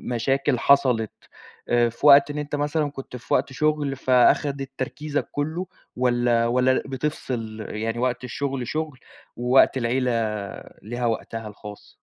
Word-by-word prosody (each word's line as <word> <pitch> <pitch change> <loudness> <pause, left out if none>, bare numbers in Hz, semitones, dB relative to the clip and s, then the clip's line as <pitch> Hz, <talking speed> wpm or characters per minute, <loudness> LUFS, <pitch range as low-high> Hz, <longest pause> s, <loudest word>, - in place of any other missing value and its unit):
مشاكل 135 +1 +1
حصلِت 125 -6 +3 0.6
آآ، 120 -1 +3
في 120 +5 -7
وقت 140 0 +8
إن 145 - -6
أنت 145 0 -3
مثلًا 150 +1 0
كنت 135 -2 -9
في 125 - -5
وقت 135 +1 +1
شُغل 150 -1 0
فأخدِت 135 +2 +2
تركيزك 145 +3 -3
كلّه 160 +6 -2 0.3
والّا 120 -2 +2
والّا 125 +2 +3
ل - - +1
بتفصل 120 -6 -4
يعني 115 +2 -3
وقت 125 0 -1
الشغل 130 +1 -3
شُغل 155 -4 -3 0.4
ووقت 125 +2 +4
العيلة 125 +1 0 0.7
ليها 120 +3 -4
وقتها 115 -1 -3
الخاص؟ 105 0 -11
130 Hz, 140 wpm, -24 LUFS, 120-145 Hz, 0.7 s, وقت